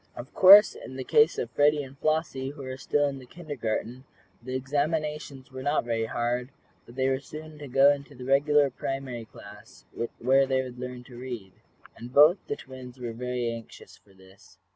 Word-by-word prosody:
Of 120 +3 -9
course 200 +3 +9
in 130 - -10
the 130 - -5
case 450 - +4
of - - -3
Freddie 145 0 +3
and 135 0 -12
Flossie, 155 -3 -1
who 140 0 -9
were 130 0 -5
still 145 +2 0
in 135 -1 -5
the 130 - -14
kindergarten, 125 -6 -5 0.4
the 130 +2 -6
examinations 145 0 -2
were 130 0 -7
not 145 -1 0
very 115 -1 -1
hard, 120 +2 -2 0.4
but 120 - -14
they 130 0 +1
were 135 0 +1
soon 155 +2 -10
to 145 - -8
go 135 +2 +5
into 140 0 -9
the 125 0 -9
regular 140 +1 +3
primary 130 -3 -5
class, 105 -1 -15 0.3
where 135 +3 +3
they 130 -1 +1
would 125 -1 -9
learn 125 -1 -7
to 125 -1 -13
read. 120 -7 -7 0.4
And 120 +1 -10
both 150 +8 +6
the - - -2
twins 130 -1 -11
were 120 -2 -5
very 125 0 -3
anxious 115 -1 -10
for 100 -2 -25
this. 95 +2 -20
130 Hz, 190 wpm, -27 LUFS, 125-145 Hz, 0.4 s, course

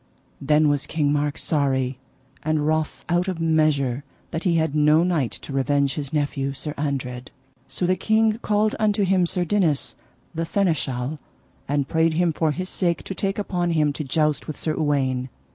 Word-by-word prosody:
Then 150 +2 +3
was 145 -1 +1
King 145 -3 +1
Mark 145 0 0
sorry 130 -4 0 0.4
and 155 -1 0
wroth 155 0 -1
out 175 +2 +1
of 185 -3 -2
measure 155 -5 +2 0.3
that 160 - -3
he 175 -2 +3
had 160 -3 +1
no 150 +2 +4
knight 165 -9 +1
to 140 - -8
revenge 140 +1 +1
his 140 -3 -5
nephew, 145 -2 -1
Sir 145 +2 -5
Andred. 130 -4 -3 0.4
So 180 - -2
the 185 +1 +3
king 220 +3 +2
called 210 +1 +1
unto 210 -1 +2
him 185 -2 +3
Sir 175 +1 0
Dinas, 170 -6 +2 0.4
the 165 0 -2
Seneschal, 155 -7 -1 0.5
and 140 -1 0
prayed 160 0 +2
him 170 -1 +2
for 160 +1 +1
his 185 +5 -3
sake 175 -3 0
to - - -5
take 195 +1 -2
upon 180 -4 -1
him 150 -2 +2
to 155 - -4
joust 150 +2 0
with 155 - -5
Sir 155 - -1
Uwaine. 135 -4 0
155 Hz, 180 wpm, -23 LUFS, 140-175 Hz, 0.5 s, no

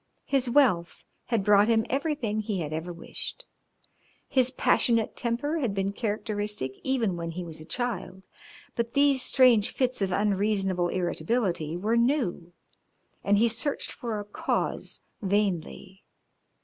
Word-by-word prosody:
His 270 -3 +1
wealth 235 -11 +2 0.2
had 230 -4 0
brought 205 0 +5
him 225 -1 +3
everything 270 -6 -1
he 210 -4 -2
had 155 -1 -4
ever 160 +3 -4
wished. 175 - -7 0.8
His 255 -2 +3
passionate 230 -3 +2
temper 255 +7 -1
had 235 -9 -1
been 195 0 -1
characteristic 210 - -3
even 235 -8 0
when 170 0 -4
he 175 +2 -5
was 160 -2 -8
a - - -10
child, 235 -6 -3 0.5
but 235 +2 -2
these 280 -2 +4
strange 250 -5 +4
fits 255 -3 -1
of 195 -1 0
unreasonable 195 -2 +1
irritability 175 -2 -1
were 215 +6 +1
new, 235 - 0 0.7
and 205 0 +3
he 230 +3 +4
searched 235 +5 -2
for 235 -6 -4
a 205 - -6
cause 205 - -2 0.2
vainly. 195 -1 -2
210 Hz, 135 wpm, -27 LUFS, 185-245 Hz, 0.8 s, brought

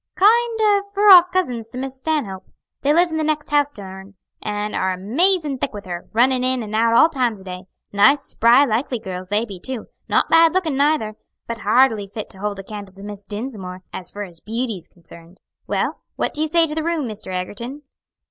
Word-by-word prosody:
"Kind 455 +4 +4
o' 410 -2 +4
fur 410 0 +6
off 360 -1 +9
cousins 245 -12 -1
to 250 - -9
Miss 265 0 -5
Stanhope. 250 -11 -2 0.3
They 285 - +2
live 340 +2 +3
in 320 - -2
that 315 - 0
next 305 -1 -1
house 290 -1 +3
to 205 - -8
hern, 190 +1 -11 0.3
and 210 0 -3
are 190 0 0
amazin' 290 - +1
thick - - -2
with 205 0 -8
her, 175 -1 -7
runnin' 250 +2 +3
in 255 -1 0
and 215 0 -8
out 230 +1 +3
all 315 - +7
times 250 -10 -1
o' - - -13
day. 180 -1 -8 0.3
Nice, 275 +8 +5
spry, 240 +5 +4
likely 245 +1 -1
girls 185 -4 -7
they 210 +4 0
be 195 -5 -9
too, 255 +2 -3 0.2
not - - +3
bad 330 0 +5
lookin' 330 -7 +1
neither, 275 -7 +1 0.3
but 230 -1 -5
hardly 220 -2 +3
fit 210 +2 -7
to 190 - -14
hold 205 0 -3
a 195 - -6
candle 200 -1 -9
to 195 - -10
Miss 205 -1 -8
Dinsmore, 205 -5 -6
as 180 - -5
fur 205 - -6
as 175 -4 -11
beauty's 220 -5 -4
concerned. 170 +1 -16 0.3
Well, - - -1 0.2
what - - -2
do 300 - -1
you 315 - +1
say 335 +1 +4
to 300 - -4
the 315 0 -2
room, 325 -5 -1
Mr. 215 -1 -8
Egerton?" 235 +10 -5
230 Hz, 215 wpm, -21 LUFS, 200-300 Hz, 0.3 s, off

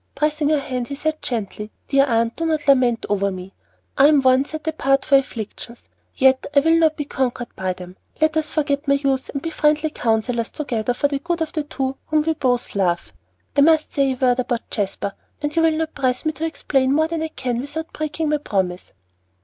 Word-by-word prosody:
Pressing 300 +1 +1
her 310 - +3
hand 255 -3 -3
he 280 - -5
said 310 +2 -2
gently, 210 -3 -4 0.2
"Dear 275 0 +4
Aunt, 230 -1 +1
do 330 - -4
not 310 -2 -1
lament 255 -4 +3
over 200 -1 +1
me. 185 0 -8 0.5
I 275 - +8
am 295 -3 +4
one 260 +1 +4
set 315 +2 -8
apart 275 -4 +1
for 275 - +4
afflictions, 235 -2 -3 0.3
yet 265 -1 +3
I 280 - +7
will 325 +2 +4
not 320 -1 +3
be 295 - -3
conquered 250 -3 -3
by 185 -1 -2
them. 180 0 -11 0.2
Let 315 0 +2
us 310 -1 0
forget 285 -1 -1
my 280 - +4
youth 275 -2 0
and 280 - -5
be 330 - -3
friendly 305 0 +1
counselors 230 -1 0
together 245 -5 -2
for 285 - +2
the 280 -1 -2
good 340 +2 -1
of 315 - -7
the 310 - 0
two 270 -2 -3
whom 310 -1 +2
we 320 +1 +1
both 250 -5 0
love. 180 -4 0 0.4
I 285 - +5
must 315 +1 +4
say 275 -2 +2
a - - -6
word 250 -1 +2
about 245 -2 -2
Jasper, 200 -1 -2 0.3
and 295 +1 -3
you 330 - +3
will 320 -1 +3
not 320 0 -2
press 255 0 -1
me 310 - +2
to 310 +2 -4
explain 270 -4 0
more 315 +2 +3
than 330 -1 -3
I 320 - -1
can 250 -6 -3
without 315 +4 -6
breaking 310 0 -2
my 300 - +2
promise." 190 -9 -2
275 Hz, 220 wpm, -21 LUFS, 245-310 Hz, 0.5 s, I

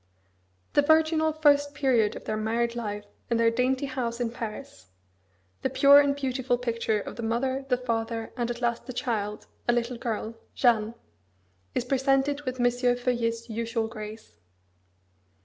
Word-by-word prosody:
The - - +5
virginal 315 +1 +3
first 290 -2 +3
period 235 -6 +2
of - - -9
their 215 - -2
married 230 +2 0
life 210 -3 -4 0.2
in 235 - +2
their 230 0 +4
dainty 255 +3 +1
house 250 -3 -3
in 235 -2 -1
Paris 215 - -7 0.7
the 265 - 0
pure 280 +2 +7
and 285 -1 +3
beautiful 260 -2 -1
picture 230 -3 -1
of 205 - -7
the - - -4
mother, 260 +4 -1
the 250 - +3
father, 230 -2 -3
and 240 -1 -2
at 240 0 -4
last 235 +1 -1
the 255 - -5
child, 210 -5 -2 0.2
a 240 - +4
little 240 +1 -1
girl, 225 -1 -3 0.2
Jeanne 230 -2 +2 0.8
is 240 - 0
presented 270 +2 +1
with 255 0 -3
M. 245 - +2
Feuillet's 245 -2 0
usual 230 0 -2
grace. 215 - -9
240 Hz, 155 wpm, -27 LUFS, 230-265 Hz, 0.8 s, pure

